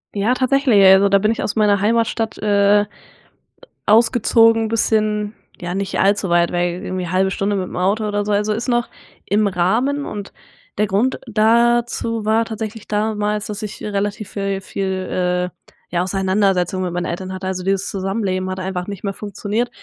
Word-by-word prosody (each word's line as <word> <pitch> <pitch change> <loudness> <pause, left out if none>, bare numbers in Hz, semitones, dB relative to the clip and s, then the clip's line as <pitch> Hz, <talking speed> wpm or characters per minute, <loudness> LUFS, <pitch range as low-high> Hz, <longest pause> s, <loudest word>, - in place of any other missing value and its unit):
Ja, 210 +5 +2
tatsächlich, 255 -5 +3
also 190 +1 +7
da 200 - +5
bin 215 +2 +2
ich 230 - -2
aus 215 - -2
meiner 205 -2 +3
Heimatstadt, 225 0 0
äh, 205 0 +3 1.0
ausgezogen, 225 0 +4
bisschen 215 -1 0 0.3
ja, 175 0 -4
nicht 195 0 -2
allzu 200 0 +2
weit, 170 0 +3
irgendwie 180 +1 -2
halbe 190 +2 +1
Stunde 200 +1 -1
mit 185 -2 -2
dem - - -7
Auto 200 +4 +1
oder 205 0 -1
so, 210 - -2
also 210 +1 +1
es 225 +3 -2
ist - - -8
noch 240 -1 0 0.4
im 205 +1 +2
Rahmen. 230 +11 0
Und 205 -2 -7 0.4
der 210 0 +2
Grund 215 +7 0
dazu 230 0 +2
war 225 +1 +2
tatsächlich 220 -1 -6
damals, 210 0 -1
dass 210 0 -6
ich, 215 -1 -7
äh, - - -4
relativ 205 0 -3
viel 195 -1 -2
viel, 185 -2 -2
äh, - - -54 0.2
ja, 175 0 +1
Auseinandersetzungen 190 -1 0
mit 175 -1 -3
meinen 175 0 -2
Eltern 185 +2 -4
hatte. 185 0 -5
Also, 185 -1 -3
dieses 195 0 0
Zusammenleben 190 -1 -2
hat 185 0 -4
einfach 185 -1 -4
nicht 200 -2 -7
mehr 195 - -2
funktioniert 210 +4 -3
205 Hz, 175 wpm, -19 LUFS, 190-220 Hz, 1.0 s, also